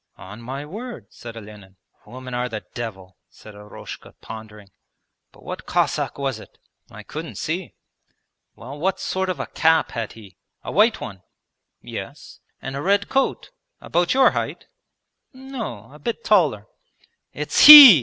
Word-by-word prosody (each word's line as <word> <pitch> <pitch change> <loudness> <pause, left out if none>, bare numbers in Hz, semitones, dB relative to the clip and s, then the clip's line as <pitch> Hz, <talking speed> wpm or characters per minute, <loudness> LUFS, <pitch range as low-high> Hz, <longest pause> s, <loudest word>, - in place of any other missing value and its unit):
'On 95 +6 -11
my 135 +4 -6
word,' 200 - -9
said 115 -1 -10
Olenin. 105 -3 -12 0.3
'Women 130 0 -9
are 125 +1 -2
the 110 -2 -6
devil,' 95 -6 -7
said 110 - -15
Eroshka 105 0 -11
pondering. 105 -2 -11 0.6
'But - - -20
what - - -8
Cossack - - 0
was 135 -5 -3
it?' - - -16 0.3
'I - - -11
couldn't - - -7
see.' - - -4 0.8
'Well, 135 +6 -10
what 190 +3 -1
sort 190 0 -2
of 185 - -3
a - - -3
cap 160 0 +2
had 115 -2 -5
he, 105 -4 -15 0.3
a - - -6
white 215 +5 +3
one?' 95 -2 -8 0.6
'Yes.' - - -9 0.2
'And 135 +1 -5
a 140 - -4
red 200 +4 +1
coat? 270 - -1 0.3
About 175 +6 0
your 265 -1 +6
height?' - - -4 0.7
'No, 230 - -8
a 150 - -14
bit 230 +9 -4
taller.' 155 - +2 0.7
'It's 150 - +4
he!' 285 - +13
135 Hz, 150 wpm, -22 LUFS, -, 0.8 s, he